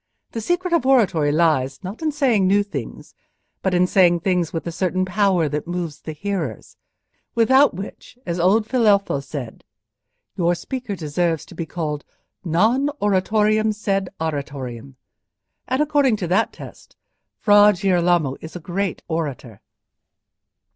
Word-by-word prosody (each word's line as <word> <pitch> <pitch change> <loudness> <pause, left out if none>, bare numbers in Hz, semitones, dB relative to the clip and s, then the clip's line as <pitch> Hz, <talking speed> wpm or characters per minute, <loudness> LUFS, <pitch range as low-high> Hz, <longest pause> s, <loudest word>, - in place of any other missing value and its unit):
The 225 - -4
secret 350 - -1
of 335 - +3
oratory 195 - +3
lies, 150 -3 +1
not 195 - -7
in 315 -1 0
saying 250 -10 +2
new 200 +2 +3
things, 145 - -7 0.5
but 190 -2 0
in 180 +1 +4
saying 175 -2 +3
things 180 -3 0
with 165 - -4
a 170 - -3
certain 185 +1 -1
power 185 -3 +2
that 150 +2 -4
moves 175 -4 -4
the 155 - -6
hearers—without 200 - -1
which, 195 +5 -9
as 170 0 -3
old 200 +6 +3
Filelfo 210 - +2
has 140 0 -8
said, 135 -6 -7 0.7
your 175 -2 +1
speaker 245 +3 -5
deserves 165 0 -1
to - - -14
be 165 -1 -5
called, 150 -4 -4 0.4
'non 220 - +2
oratorem, 215 +2 +2
sed 195 -3 -1
aratorem.' 140 -5 -5 0.7
And, 260 +3 0
according 285 -5 +2
to 190 -4 -4
that 195 +5 +2
test, - - -13 0.4
Fra 205 -1 +6
Girolamo 175 -7 +2
is 160 - -10
a - - -5
great 185 +3 -3
orator." 140 - -4
180 Hz, 140 wpm, -21 LUFS, 160-210 Hz, 0.7 s, Fra